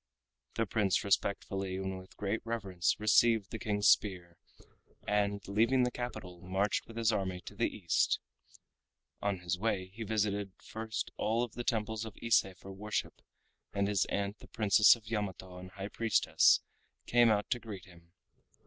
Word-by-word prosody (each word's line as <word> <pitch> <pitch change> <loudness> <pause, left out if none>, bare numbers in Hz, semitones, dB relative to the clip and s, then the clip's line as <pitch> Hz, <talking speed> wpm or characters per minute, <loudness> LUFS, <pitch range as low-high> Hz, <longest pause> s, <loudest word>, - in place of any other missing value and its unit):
The 115 - +1
Prince 105 -2 +1
respectfully 95 -1 -1
and 95 0 -3
with 95 - -15
great 105 +2 -2
reverence 100 -8 -1
received 110 0 +4
the 110 - -5
King's 105 -1 +1
spear, 90 -4 +2 0.7
and 100 0 0
leaving 115 +6 +3
the 125 - +1
capital, 95 -9 -6
marched 95 +3 -1
with 115 - -11
his 115 -1 +3
army 95 -4 -2
to - - -10
the - - 0
East. 85 -5 +1 1.0
On 100 -3 -1
his 90 0 -2
way 95 -3 -1
he 115 - -10
visited 105 -3 -1
first 110 0 -5
of - - -50
all 115 +3 +1
the 120 +2 -7
temples 110 -2 -1
of 110 -3 -9
Ise 115 -1 +4
for 95 +2 -10
worship, 105 +2 -4 0.5
and 100 0 +1
his 100 -3 +2
aunt 100 +1 -2
the - - -14
Princess 105 0 +5
of 115 -2 -16
Yamato 95 -4 -4
and 90 0 -9
High 100 +1 -7
Priestess 115 0 +3 0.4
came 120 -1 +5
out 105 -1 +1
to 120 - +1
greet 105 -5 -8
him. 85 -2 -18
105 Hz, 165 wpm, -32 LUFS, 95-110 Hz, 1.0 s, Princess